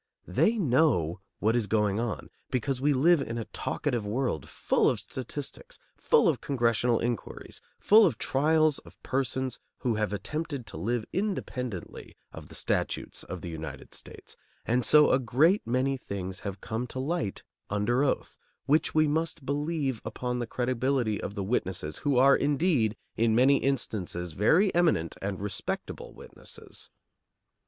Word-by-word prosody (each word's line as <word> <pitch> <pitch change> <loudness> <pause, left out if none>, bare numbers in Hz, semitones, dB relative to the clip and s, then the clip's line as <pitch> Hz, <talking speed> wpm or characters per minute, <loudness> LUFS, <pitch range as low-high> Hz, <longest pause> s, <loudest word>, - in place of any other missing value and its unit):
They 230 +2 +2
know 125 - +2 0.2
what 110 +2 +1
is 115 -4 +1
going 105 -1 +1
on, 115 -2 -3 0.2
because 130 0 -1
we 145 +2 +3
live 150 +4 +4
in 115 -3 -4
a 115 - -3
talkative 125 -7 -2
world, 110 - -2
full - - +2
of - - -1
statistics, - - -7 0.2
full - - +3
of - - +1
congressional 120 -2 +1
inquiries, 120 -3 -4 0.2
full 215 +1 +7
of - - -2
trials 155 +2 +2
of - - -17
persons 130 -1 -1 0.2
who 120 - +1
have 105 -1 0
attempted 140 +6 -4
to - - -8
live 110 +6 -1
independently 125 - -4 0.2
of - - -9
the - - -9
statutes - - -1
of - - -7
the - - -6
United 80 -4 -7
States; - - -9 0.3
and 125 +2 +1
so 150 +3 +6
a 130 - +4
great 140 - +3
many 130 +3 +1
things 95 -6 -5
have 100 -1 -6
come 115 +3 -3
to 125 - -8
light 150 - -2 0.3
under 110 +6 +1
oath, 145 - -1 0.3
which 155 +3 +2
we 155 0 +5
must 155 -1 -1
believe 145 -3 -1
upon 125 0 -3
the 120 - -3
credibility 125 -2 0
of 100 - -5
the 100 - -2
witnesses 95 -7 -2
who 140 -3 +1
are, 135 +2 +7
indeed, 145 - +1 0.2
in 115 -1 +3
many 135 +4 +5
instances 90 - -2
very 165 - +3
eminent 165 - +2
and 95 -1 -3
respectable 100 -2 -4
witnesses. - - -11
125 Hz, 155 wpm, -28 LUFS, 105-145 Hz, 0.3 s, full